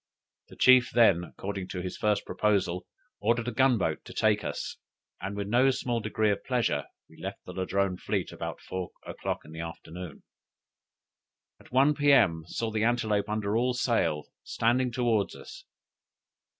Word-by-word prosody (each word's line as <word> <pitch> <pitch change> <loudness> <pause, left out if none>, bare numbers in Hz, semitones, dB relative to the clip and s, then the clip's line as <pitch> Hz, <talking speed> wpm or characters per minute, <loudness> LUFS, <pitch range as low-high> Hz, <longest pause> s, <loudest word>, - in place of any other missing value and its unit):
The - - -14
chief, 130 -1 +6
then, 100 -7 +4
according 95 +1 -6
to 95 -1 -5
his 90 - -4
first 105 -1 0
proposal, 95 -4 0 0.3
ordered 115 +3 +1
a - - 0
gun 130 +1 +4
boat 80 -5 -1
to - - -10
take 105 -1 +2
us, - - -4 0.4
and 100 +1 -4
with 100 -1 -3
no 125 +5 +4
small 120 -2 -1
degree 110 0 +1
of 100 - -2
pleasure 120 - 0 0.2
we - - -17
left - - -6
the - - -8
Ladrone 95 0 0
fleet - - -2
about - - -6
four 95 -1 -5 0.2
o'clock - - -4
in 75 - -12
the 80 - -8
afternoon. 85 0 -8 1.4
At - - -19
one 135 +4 +5
P.M. 120 - +4
saw 115 +5 -3
the 110 0 0
Antelope 110 -3 +1
under 105 -1 -1
all 125 +2 +2
sail, 85 - +1 0.2
standing 120 +2 +1
towards 115 -4 +1
us. 380 0 -11
105 Hz, 165 wpm, -28 LUFS, 95-120 Hz, 1.4 s, chief